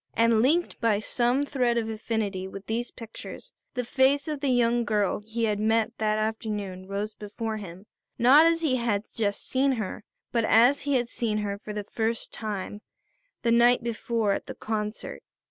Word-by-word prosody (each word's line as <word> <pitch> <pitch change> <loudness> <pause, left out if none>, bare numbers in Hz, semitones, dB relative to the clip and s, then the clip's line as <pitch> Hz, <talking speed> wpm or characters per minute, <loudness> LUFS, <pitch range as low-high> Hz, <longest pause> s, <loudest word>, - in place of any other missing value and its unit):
And 230 -1 +4
linked 315 +6 +1
by 225 -3 +3
some 240 +5 +1
thread 250 -5 0
of 225 -1 0
affinity 215 -4 -2
with 195 +1 -9
these 235 +3 -2
pictures, 230 -2 -10 0.2
the 250 -1 -1
face 270 +4 +2
of 300 -2 -3
the 280 -1 0
young 240 -1 +3
girl 210 -3 0
he 230 +1 -2
had 210 -2 +1
met 225 +1 +1
that 215 -1 +1
afternoon 210 -4 -3
rose 205 +2 -3
before 215 +2 -5
him. 190 -1 -9 0.3
Not 280 +7 +7
as 330 0 +2
he 265 -5 +2
had 225 -4 0
just 205 -3 -1
seen 270 +1 +2
her, 220 -2 -4 0.3
but 230 -1 +1
as 240 +6 +5
he 280 - +3
had 245 -2 +1
seen 225 -2 -1
her, 200 0 -3
for 215 - -8
the 210 0 -4
first 225 +2 -2
time, 210 -1 -5 0.6
the 235 - +2
night 240 +1 +5
before 230 -2 -1
at - - -2
the - - -6
concert. 215 -1 -4
225 Hz, 180 wpm, -27 LUFS, 210-240 Hz, 0.6 s, Not